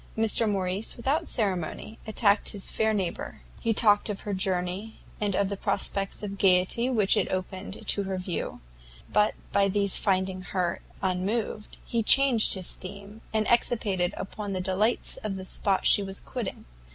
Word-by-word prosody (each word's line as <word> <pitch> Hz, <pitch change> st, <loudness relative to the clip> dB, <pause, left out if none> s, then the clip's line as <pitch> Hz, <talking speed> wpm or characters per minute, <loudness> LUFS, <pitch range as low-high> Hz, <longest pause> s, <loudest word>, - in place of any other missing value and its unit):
Mr 225 Hz, 0 st, +4 dB
Morrice, 195 Hz, +1 st, -2 dB
without 290 Hz, +8 st, 0 dB
ceremony, 200 Hz, 0 st, -1 dB
attacked 210 Hz, -1 st, +3 dB
his 200 Hz, -2 st, -4 dB
fair 220 Hz, 0 st, +1 dB
neighbour; 195 Hz, -5 st, -3 dB, 0.2 s
he 230 Hz, -, 0 dB
talked 210 Hz, -1 st, +3 dB
of 205 Hz, -, -4 dB
her 205 Hz, -, -4 dB
journey, 185 Hz, +3 st, -2 dB, 0.2 s
and 205 Hz, -2 st, 0 dB
the 200 Hz, +1 st, 0 dB
prospects 195 Hz, +1 st, -1 dB
of 200 Hz, -1 st, -5 dB
gaiety 190 Hz, +6 st, +3 dB
which 215 Hz, -6 st, +3 dB
it -, -, 0 dB
opened 185 Hz, +1 st, -5 dB
to 200 Hz, -, +3 dB
her 190 Hz, -1 st, -3 dB
view; 185 Hz, -2 st, -4 dB, 0.5 s
but 210 Hz, 0 st, +3 dB, 0.2 s
by 200 Hz, 0 st, +3 dB
these 200 Hz, 0 st, +2 dB
finding 190 Hz, -1 st, 0 dB
her 180 Hz, -1 st, -2 dB, 0.2 s
unmoved, 200 Hz, +4 st, -2 dB
he 235 Hz, -2 st, -1 dB
changed 250 Hz, -1 st, +5 dB
his 185 Hz, -2 st, -2 dB
theme, 200 Hz, +3 st, -10 dB
and 220 Hz, -1 st, +1 dB
expatiated 205 Hz, -6 st, +1 dB
upon 205 Hz, +1 st, -5 dB
the 185 Hz, -, -2 dB
delights 195 Hz, +5 st, 0 dB
of 210 Hz, -2 st, -4 dB
the 190 Hz, -1 st, -7 dB
spot 195 Hz, +1 st, -1 dB
she -, -, +6 dB
was 195 Hz, 0 st, -3 dB
quitting. 240 Hz, -7 st, -6 dB
200 Hz, 160 wpm, -27 LUFS, 190-215 Hz, 0.5 s, she